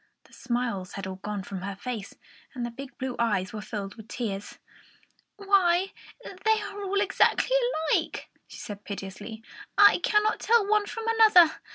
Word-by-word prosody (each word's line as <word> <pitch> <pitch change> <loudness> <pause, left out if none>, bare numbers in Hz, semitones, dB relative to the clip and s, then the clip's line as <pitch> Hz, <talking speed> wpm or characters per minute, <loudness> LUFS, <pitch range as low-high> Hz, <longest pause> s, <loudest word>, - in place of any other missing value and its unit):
The - - -23
smiles 235 -7 -3
had 195 - -5
all 190 0 -6
gone 205 0 -5
from 190 -1 -6
her 195 +1 -5
face, 220 -1 -6 0.4
and 245 -2 -3
the 240 - -5
big 275 +3 -10
blue 260 -2 -4
eyes 205 -5 0
were 215 - -5
filled 205 -2 -5
with 220 -2 -13
tears. 205 -5 -5 0.8
"Why, 390 -2 +3 0.5
they 440 0 +3
are 410 -1 -7
all 400 +1 0
exactly 410 +4 +2 0.4
alike!" - - -1 0.2
she - - -12
said 205 -2 -8
piteously. 200 +3 -7 0.3
"I 410 0 +7
cannot 425 +1 +2
tell 460 -3 +3
one 420 0 +2
from 455 - -6
another." 430 -8 +6
245 Hz, 165 wpm, -27 LUFS, -, 0.8 s, I